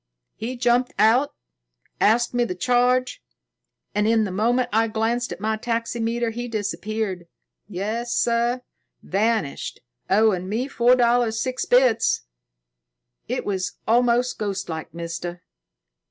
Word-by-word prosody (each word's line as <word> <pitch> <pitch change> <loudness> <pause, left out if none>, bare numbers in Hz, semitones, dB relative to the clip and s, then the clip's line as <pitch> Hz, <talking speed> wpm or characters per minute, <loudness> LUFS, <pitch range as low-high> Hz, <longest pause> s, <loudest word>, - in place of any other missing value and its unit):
He 240 +4 -5
jumped 245 +1 +2
out, 230 +7 +3 0.6
asked 235 +3 +3
me 245 0 +2
the 185 -6 -3
charge, 250 - +1 0.7
and, 210 +1 +1
in 225 -1 +3
the 200 - -3
moment 240 +6 +1
I 225 +1 +3
glanced 225 +2 -1
at - - -6
my 220 +1 -1
taxi 230 0 -2
meter, 230 +1 -1
he 240 +2 -5
disappeared. 210 -4 -3 0.4
Yes, 215 +5 -3
sir. 240 +2 +1 0.4
Vanished, 210 -6 -1 0.3
owing 195 -2 +3
me 235 +6 -1
four 245 -2 +4
dollars, 240 -2 +2
six 255 +1 -2
bits. 245 -2 +3 1.0
It - - -3
was 190 -2 -2
almost 240 +2 +2
ghostlike, 190 -6 -4
mister." 170 +1 -6
225 Hz, 125 wpm, -23 LUFS, 210-245 Hz, 1.0 s, four